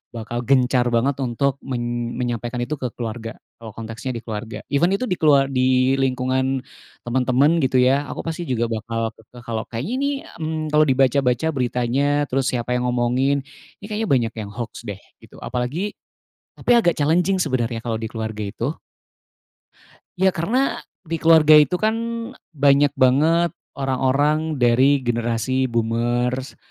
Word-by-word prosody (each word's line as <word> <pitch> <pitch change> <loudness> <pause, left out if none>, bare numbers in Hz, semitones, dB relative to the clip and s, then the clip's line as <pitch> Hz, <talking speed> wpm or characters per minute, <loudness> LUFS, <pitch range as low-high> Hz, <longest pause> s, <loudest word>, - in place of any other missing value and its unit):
bakal 115 +1 -4
gencar 125 -1 +3
banget 130 +4 +1
untuk 135 +2 0
men 120 -2 -3
menyampaikan 120 0 -3
itu 150 +5 -3
ke 125 - -2
keluarga, 115 0 -5 0.3
kalau 110 -3 -10
konteksnya 115 +3 -5
di 115 - -5
keluarga. 110 0 -6
Even 170 +7 +3
itu 200 - -3
di 180 - 0
kelua 140 -3 +4
di 130 0 +2
lingkungan 130 0 0 0.4
temen-temen 130 +6 +2
gitu 130 -1 +2
ya, 140 +3 +3
aku - - -5
pasti 165 +1 -4
juga 120 -2 0
bakal 115 0 -2
ke 115 +2 -15
kalau 115 -2 -4
kayaknya 125 - -4
nih, 280 0 0 0.2
mmm, 160 0 -3
kalau 150 0 +5
dibaca-baca 135 +1 +2
beritanya, 135 +2 0
terus 135 0 0
siapa 125 -1 -2
yang 125 - -2
ngomongin, 125 +3 +1 0.4
ini - - -9
kayaknya 215 0 -2
banyak 120 -4 +1
yang 105 -2 -5
hoax 120 +1 -7
deh 100 -1 -6 0.2
gitu, - - -17
apalagi 130 - -2 0.7
tapi - - 0
agak 195 -8 +4
challenging 175 +6 +2
sebenarnya 120 -7 -1
kalau 115 -1 -3
di 110 - -5
keluarga 110 -2 -4
itu. 115 +6 -3 1.5
Ya 190 0 +3
karena 240 +12 0 0.2
di 165 0 -4
keluarga 160 -2 +6
itu 150 +4 +6
kan 215 +3 +1 0.4
e - - -19 0.2
banyak 140 +1 +5
banget 155 +6 +3 0.2
orang-orang 140 +3 +1
dari 130 +4 +4
generasi 120 +2 0
boomers 120 +3 -1
130 Hz, 150 wpm, -21 LUFS, 120-145 Hz, 1.5 s, keluarga